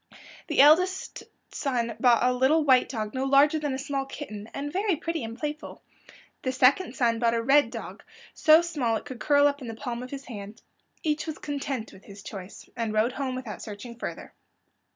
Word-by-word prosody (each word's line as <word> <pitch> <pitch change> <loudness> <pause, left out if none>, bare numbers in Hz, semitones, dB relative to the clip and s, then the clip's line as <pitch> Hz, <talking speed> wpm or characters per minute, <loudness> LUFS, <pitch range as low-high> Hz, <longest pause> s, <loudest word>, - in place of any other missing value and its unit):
The - - +4
eldest 365 +6 +4 0.3
son 240 -5 -1
bought 240 -1 +4
a 250 - +2
little 265 +6 +3
white 260 -3 +4
dog 215 -4 -4
no 260 - -2
larger 280 +3 +4
than 290 -3 -2
a - - -3
small 275 0 -2
kitten, 215 -8 -8
and 290 +2 -5
very 390 0 +1
pretty 325 -2 -3
and 225 +1 -6
playful. 300 +3 -6 0.6
The 260 - -1
second 260 +8 +3
son 230 -4 +1
bought 235 -1 +2
a 230 - -1
red 285 +4 +4
dog - - -8 0.3
so 315 +1 +6
small 285 -10 -1
it - - -5
could 260 -4 -8
curl 285 +5 +4
up 285 0 +1
in 250 - -7
the 225 - -6
palm 240 0 -5
of 250 - -7
his 275 0 -7
hand. 205 -2 -9 0.4
Each 310 0 -1
was 315 - -4
content 275 -5 -4
with 190 - -16
his 200 0 -12
choice, 195 -1 -9
and 230 -3 -2
rode 215 +3 +2
home 265 -1 -3
without 245 -5 -6
searching 220 +3 -8
further. - - -6
260 Hz, 200 wpm, -27 LUFS, 230-290 Hz, 0.6 s, so